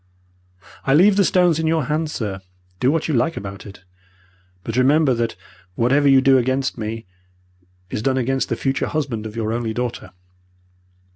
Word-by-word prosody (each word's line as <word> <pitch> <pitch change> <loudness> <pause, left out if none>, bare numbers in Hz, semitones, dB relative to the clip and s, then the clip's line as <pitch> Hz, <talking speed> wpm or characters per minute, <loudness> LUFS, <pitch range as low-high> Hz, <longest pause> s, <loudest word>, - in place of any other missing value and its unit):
I 135 - +2
leave 190 +5 +5
the 200 - +4
stones 175 -3 +3
in 160 - 0
your 160 -1 +1
hands, 150 +3 -2
sir. 100 -8 -4 0.4
Do 125 - +2
what 160 +2 0
you 155 - -1
like 150 +7 0
about 100 +1 -7
it. 100 -2 -13 0.8
But 115 - -5
remember 135 +2 +3
that 115 -1 -2 0.4
whatever 140 +6 +2
you 135 -1 +6
do 135 0 +5
against 130 +2 -1
me, 110 -1 -5 0.9
is - - -3
done 130 +3 0
against 135 +1 -1
the - - 0
future 135 0 -1
husband 130 -8 -3
of 105 - -10
your 110 -1 -2
only 115 -2 -3
daughter. 125 -1 -4
130 Hz, 170 wpm, -20 LUFS, 115-150 Hz, 0.9 s, you